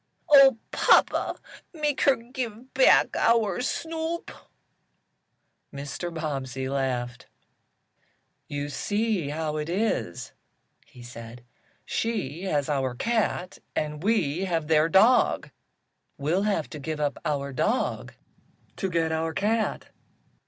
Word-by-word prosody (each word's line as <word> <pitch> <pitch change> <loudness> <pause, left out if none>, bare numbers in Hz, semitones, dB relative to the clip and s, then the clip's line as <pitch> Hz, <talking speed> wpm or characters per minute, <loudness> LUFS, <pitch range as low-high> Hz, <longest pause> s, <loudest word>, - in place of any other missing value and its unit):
Oh, 275 -4 +8
papa, - - +3 0.4
make 295 -3 -1
her 275 - +6
give 240 0 -7
back 260 0 +5
our 225 -4 +2
Snoop!" 325 +4 -3 1.4
Mr. 145 +5 -5
Bobbsey 135 -5 -4
laughed. 125 -2 -2 1.2
"You 145 0 -4
see 205 +1 -1
how 155 0 -2
it 150 +1 -3
is," 185 - -2 0.6
he 125 - -14
said. 120 0 -10 0.4
"She 195 - -2
has 145 -7 0
our 135 -4 -1
cat, 220 - -1 0.2
and 150 0 -2
we 190 -5 +1
have 165 -4 -1
their 155 0 +4
dog. 220 +9 +4 0.7
We'll 155 +7 0
have 165 -7 -1
to 150 - -7
give 155 +2 -4
up 145 -1 -1
our 140 -2 -2
dog 220 - -1 0.6
to 195 - -2
get 165 -2 0
our 160 0 -2
cat." 220 +2 -1
165 Hz, 110 wpm, -26 LUFS, 145-225 Hz, 1.4 s, Oh